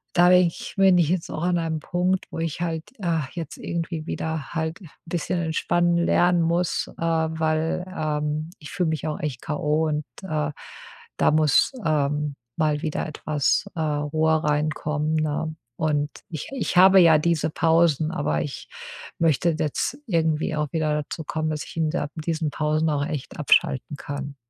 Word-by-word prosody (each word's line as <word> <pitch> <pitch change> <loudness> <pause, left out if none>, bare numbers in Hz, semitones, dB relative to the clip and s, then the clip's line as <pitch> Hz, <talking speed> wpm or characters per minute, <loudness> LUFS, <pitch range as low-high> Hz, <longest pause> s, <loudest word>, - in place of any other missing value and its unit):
da 175 0 +6
bin 180 -1 +6
ich 165 - -7
bin 190 -2 +6
ich 165 -3 +3
jetzt 180 -2 -1
auch 155 - -4
an 175 -1 +2
einem 160 -2 -1
Punkt, 180 +1 0
wo - - -5
ich 165 0 -3
halt, 165 -2 -2 0.2
äh, 170 -4 0
jetzt 165 -4 -6
irgendwie 165 -2 -4
wieder 160 -3 -4
halt 160 0 -2
'n 180 - -12 0.2
bisschen 175 +1 -2
entspannen 170 +1 +1
lernen 175 0 +3
muss, 170 +2 0
äh, - - -12
weil, 160 0 0
ähm, 150 0 -2
ich 150 - -11
fühle 180 -3 0
mich 160 -1 -2
auch 150 - -3
echt 140 -6 -4
K. 150 - -3
o. 155 +2 +1
und, 150 -1 -2 0.2
äh, 150 -4 -1 0.7
da - - +4
muss, 155 - +4
ähm, 150 -1 0 0.2
mal 150 -2 +1
wieder 155 -3 -2
etwas, 150 -1 0
äh, 165 - -5
Ruhe 155 +1 +1
reinkommen, 150 +1 0
ne? 155 0 -1 0.2
Und 150 -1 0 0.2
ich 160 -4 -5
ich 260 -8 -2
habe 190 +1 +8
ja 160 -2 +7
diese 165 0 +1
Pausen, 160 -1 +2
aber 145 - 0
ich 140 - -6 0.5
möchte 165 +1 +2
jetzt 155 - -1
irgendwie 160 -4 +1
auch 150 -1 -2
wieder 155 -2 0
dazu 160 +2 -7
kommen, 155 +1 -2
dass 155 -1 -3
ich - - -11
in 160 -1 +1
der 150 -3 -2
in 155 - -5
diesen 160 -1 -1
Pausen 155 +1 +1
auch 145 -1 0
echt 150 -4 -5
abschalten 145 -1 +2
kann. 140 0 -6
160 Hz, 175 wpm, -24 LUFS, 150-170 Hz, 0.7 s, habe